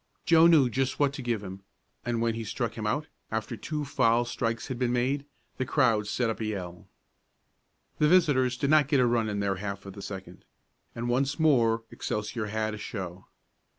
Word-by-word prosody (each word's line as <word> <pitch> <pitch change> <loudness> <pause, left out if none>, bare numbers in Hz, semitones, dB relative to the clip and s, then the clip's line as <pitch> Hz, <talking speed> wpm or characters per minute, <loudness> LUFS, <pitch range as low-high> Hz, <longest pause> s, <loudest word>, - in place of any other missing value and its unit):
Joe 165 0 +7
knew 155 -6 +6
just 130 +2 -1
what 140 -1 +3
to 140 - -6
give 120 -4 -2
him, 95 0 -8 0.4
and 115 -1 -1
when 115 -1 +1
he 115 0 -4
struck 105 - -3
him - - -4
out, - - 0 0.2
after - - -3
two 150 -2 -4
foul 120 -3 +2
strikes 115 -1 -2
had 130 -3 -5
been 125 -2 +1
made, 130 +4 0 0.3
the 130 - 0
crowd 115 -8 +2
set 120 +3 0
up 110 - -2
a 110 - -2
yell. 90 -5 -5 1.1
The 150 - +4
visitors 140 -8 +3
did 140 +2 0
not 155 -3 +5
get 145 -2 +3
a 125 - +5
run 115 -2 +1
in 100 -1 -2
their 100 -1 0
half 100 0 -5
of 100 - -8
the 100 - -9
second, 95 -3 -8 0.5
and 115 +1 -3
once 135 +5 0
more 120 -7 +3
Excelsior 105 +1 -3
had 110 +1 -2
a 105 - -6
show. 95 -4 -6
120 Hz, 200 wpm, -28 LUFS, 105-135 Hz, 1.1 s, Joe